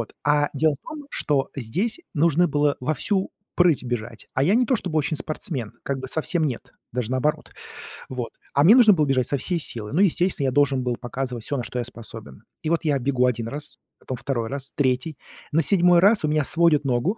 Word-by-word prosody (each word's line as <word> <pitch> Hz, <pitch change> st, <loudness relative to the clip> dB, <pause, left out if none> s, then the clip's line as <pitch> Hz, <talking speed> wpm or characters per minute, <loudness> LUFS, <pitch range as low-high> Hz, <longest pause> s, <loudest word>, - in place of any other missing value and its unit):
Вот. 115 Hz, -, -6 dB
А 145 Hz, 0 st, +3 dB
дело 155 Hz, +1 st, +2 dB
в -, -, -17 dB
том, 300 Hz, -3 st, -8 dB
что 140 Hz, -2 st, 0 dB
здесь 185 Hz, -, -1 dB
нужно 165 Hz, +3 st, +3 dB
было 145 Hz, 0 st, +1 dB
во 150 Hz, +5 st, -1 dB
всю 195 Hz, +4 st, -1 dB, 0.3 s
прыть 175 Hz, -7 st, +3 dB
бежать, 120 Hz, -2 st, -5 dB
а 130 Hz, -, +1 dB
я 185 Hz, +8 st, +3 dB
не 245 Hz, +1 st, +3 dB
то 260 Hz, -, +2 dB
чтобы 175 Hz, -7 st, -2 dB
очень 155 Hz, +1 st, -1 dB
спортсмен, 140 Hz, -, -5 dB
как 140 Hz, -1 st, -3 dB
бы 130 Hz, -, -6 dB
совсем 160 Hz, +3 st, 0 dB
нет, 130 Hz, -6 st, -4 dB, 0.2 s
даже 125 Hz, -1 st, -3 dB
наоборот, 150 Hz, +4 st, -1 dB, 0.6 s
вот, 125 Hz, -2 st, -5 dB, 0.2 s
а 140 Hz, -, +3 dB
мне 210 Hz, +7 st, +8 dB
нужно 240 Hz, -4 st, +7 dB
было 155 Hz, -4 st, +2 dB
бежать 130 Hz, -3 st, +1 dB
со 140 Hz, -, 0 dB
всей 170 Hz, +6 st, -2 dB
силы, 115 Hz, -7 st, -5 dB
ну, 175 Hz, -, +3 dB
естественно, 180 Hz, -5 st, +2 dB
я -, -, +1 dB
должен 140 Hz, -1 st, +2 dB
был 125 Hz, -1 st, -1 dB
показывать 125 Hz, -1 st, -5 dB
всё, 145 Hz, -, -2 dB
на 125 Hz, -, -3 dB
что 125 Hz, -, -4 dB
я 120 Hz, -, -2 dB
способен. 115 Hz, -, -10 dB, 0.2 s
И 155 Hz, -, -1 dB
вот 170 Hz, 0 st, +1 dB
я 140 Hz, -3 st, +2 dB
бегу 125 Hz, -1 st, +1 dB
один 120 Hz, -2 st, -1 dB
раз, 145 Hz, +5 st, -6 dB, 0.2 s
потом 130 Hz, -, -6 dB
второй 120 Hz, -4 st, -3 dB
раз, 140 Hz, 0 st, -6 dB
третий, 130 Hz, +2 st, 0 dB, 0.4 s
на 165 Hz, -, +4 dB
седьмой 175 Hz, +2 st, +5 dB
раз 205 Hz, -1 st, +4 dB
у -, -, 0 dB
меня 150 Hz, 0 st, +1 dB
сводит 160 Hz, 0 st, +3 dB
ногу, 135 Hz, -, 0 dB
145 Hz, 220 wpm, -23 LUFS, 125-165 Hz, 0.6 s, мне